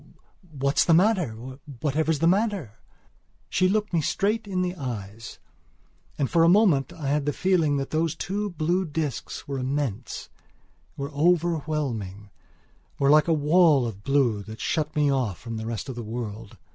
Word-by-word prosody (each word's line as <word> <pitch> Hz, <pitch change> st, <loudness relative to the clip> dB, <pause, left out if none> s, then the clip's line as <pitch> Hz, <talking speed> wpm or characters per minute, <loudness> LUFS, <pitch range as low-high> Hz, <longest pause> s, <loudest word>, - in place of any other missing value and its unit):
What's 140 Hz, -1 st, +1 dB
the 165 Hz, -, +4 dB
matter? 180 Hz, -, +3 dB, 0.5 s
Whatever's 155 Hz, +3 st, 0 dB
the 165 Hz, -, +2 dB
matter?" 185 Hz, -, 0 dB, 0.7 s
She 185 Hz, 0 st, +3 dB
looked 210 Hz, 0 st, 0 dB
me 165 Hz, -, +2 dB
straight 210 Hz, +8 st, 0 dB
in 185 Hz, -2 st, -1 dB
the 180 Hz, 0 st, -2 dB
eyes; 115 Hz, -, -7 dB, 0.8 s
and 140 Hz, -, +1 dB
for 165 Hz, +3 st, +3 dB
a 165 Hz, -, +6 dB
moment 175 Hz, -, +4 dB
I 145 Hz, -4 st, -5 dB
had 145 Hz, 0 st, 0 dB
the -, -, +3 dB
feeling 165 Hz, -6 st, +2 dB
that 135 Hz, -1 st, -4 dB
those 160 Hz, +1 st, 0 dB
two 205 Hz, +5 st, -3 dB
blue 175 Hz, +2 st, 0 dB
discs 150 Hz, -6 st, -4 dB
were 140 Hz, -1 st, -3 dB
immense, 130 Hz, -4 st, -3 dB, 0.7 s
were 140 Hz, +2 st, -4 dB
overwhelming, 150 Hz, -, -1 dB, 0.7 s
were 140 Hz, 0 st, +3 dB
like 155 Hz, +2 st, +5 dB
a -, -, +2 dB
wall 155 Hz, -2 st, +4 dB
of 100 Hz, -3 st, -6 dB
blue 135 Hz, -7 st, +2 dB
that 110 Hz, +2 st, -10 dB
shut 155 Hz, +4 st, -1 dB
me 145 Hz, -2 st, +3 dB
off 125 Hz, -9 st, -1 dB
from 115 Hz, -2 st, -6 dB
the 110 Hz, 0 st, -5 dB
rest 115 Hz, +1 st, -4 dB
of 130 Hz, -, -4 dB
the 120 Hz, -, -6 dB
world. 110 Hz, -1 st, -6 dB
145 Hz, 165 wpm, -25 LUFS, 120-170 Hz, 0.8 s, a